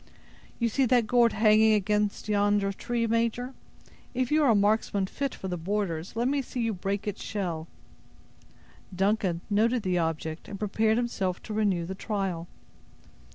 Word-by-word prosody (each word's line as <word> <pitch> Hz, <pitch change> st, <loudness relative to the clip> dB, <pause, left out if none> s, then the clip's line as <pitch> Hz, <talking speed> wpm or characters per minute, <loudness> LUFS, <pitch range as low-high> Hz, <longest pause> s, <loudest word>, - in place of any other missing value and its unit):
"You 235 Hz, -, +1 dB
see 260 Hz, +3 st, +1 dB
that 245 Hz, -1 st, +3 dB
gourd 235 Hz, +1 st, +4 dB
hanging 215 Hz, 0 st, +5 dB
against 210 Hz, 0 st, 0 dB
yonder 205 Hz, -1 st, +2 dB
tree, 235 Hz, +3 st, -2 dB
major; 230 Hz, +3 st, 0 dB, 0.6 s
if 255 Hz, +1 st, 0 dB
you 310 Hz, +1 st, +4 dB
are 285 Hz, -, +4 dB
a 225 Hz, -, +5 dB
marksman 205 Hz, -1 st, +2 dB
fit 275 Hz, +7 st, -3 dB
for 190 Hz, -, -6 dB
the 180 Hz, -1 st, -3 dB
borders, 180 Hz, -1 st, -3 dB
let 235 Hz, +2 st, +1 dB
me 280 Hz, +1 st, +1 dB
see 255 Hz, -1 st, -6 dB
you 230 Hz, -1 st, 0 dB
break 195 Hz, +2 st, -3 dB
its 205 Hz, -, -4 dB
shell!" 170 Hz, -6 st, -3 dB, 1.3 s
Duncan 195 Hz, -3 st, +1 dB
noted 225 Hz, +3 st, +2 dB
the 180 Hz, -1 st, +1 dB
object, 160 Hz, -1 st, -3 dB
and 200 Hz, -, -6 dB
prepared 215 Hz, +2 st, +1 dB
himself 195 Hz, -7 st, -1 dB
to 215 Hz, -, -6 dB
renew 200 Hz, -5 st, +1 dB
the 190 Hz, -, -5 dB
trial. 190 Hz, -4 st, -3 dB
210 Hz, 160 wpm, -28 LUFS, 190-230 Hz, 1.3 s, hanging